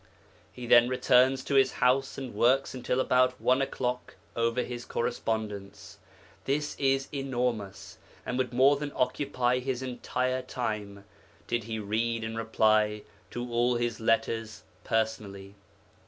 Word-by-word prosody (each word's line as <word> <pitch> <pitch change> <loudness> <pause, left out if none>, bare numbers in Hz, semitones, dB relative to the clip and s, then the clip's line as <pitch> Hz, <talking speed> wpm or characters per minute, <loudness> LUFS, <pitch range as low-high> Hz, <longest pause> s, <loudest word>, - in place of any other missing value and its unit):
'He 125 - -8
then 120 +1 +6
returns 130 +1 +3
to - - -3
his 135 -2 +4
house 130 +2 +1
and 130 -4 -6
works 125 +6 +2
until 125 0 -2
about 130 0 +2
one 130 +2 +2
o'clock 125 -2 -3 0.2
over 115 +1 +1
his 120 -1 -6
correspondence. 105 -5 -4 0.5
This 145 +2 -1
is 135 -1 +1
enormous, 120 -8 -3 0.3
and 125 - -3
would 125 -2 -1
more 135 +3 +4
than 145 0 -4
occupy 125 -2 0
his 130 0 -3
entire 130 0 -2
time, 105 -6 -4 0.4
did 120 -2 -2
he 110 -1 -4
read 110 +2 -1
and 110 0 -4
reply 110 -1 +2 0.3
to 120 0 -5
all 120 +1 +2
his 120 -1 -2
letters 115 -2 -1 0.2
personally. 110 -4 -2
120 Hz, 135 wpm, -28 LUFS, 110-130 Hz, 0.5 s, then